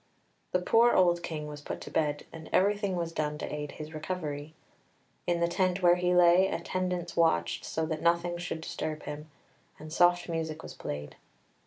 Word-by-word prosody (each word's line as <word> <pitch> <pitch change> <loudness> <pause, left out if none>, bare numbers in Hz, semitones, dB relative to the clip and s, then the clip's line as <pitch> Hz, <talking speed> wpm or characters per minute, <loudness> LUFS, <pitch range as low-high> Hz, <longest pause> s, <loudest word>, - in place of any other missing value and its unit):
The - - +3
poor 230 +6 +4
old 175 -2 +4
King 155 -3 -4
was 150 -1 -8
put - - -5
to - - -8
bed, 150 -2 0
and 160 -1 -9
everything 200 0 +2
was 170 -1 -2
done 150 -2 -2
to - - -5
aid 150 -1 -4
his 155 +1 -8
recovery; 155 -2 -4 0.7
in 175 -1 +1
the 170 - +4
tent 180 +1 0
where 175 0 +6
he 180 0 +2
lay 180 +2 +6
attendants 180 -3 -2
watched 85 - +2
so 160 - -2
that 155 -1 -3
nothing 170 +1 +1
should 175 -2 -4
disturb 155 -1 -4
him, 150 +1 -7 0.5
and 155 0 -9
soft 175 +1 +4
music 160 -2 -3
was - - -8
played. 75 0 -6
170 Hz, 180 wpm, -30 LUFS, 155-180 Hz, 0.7 s, where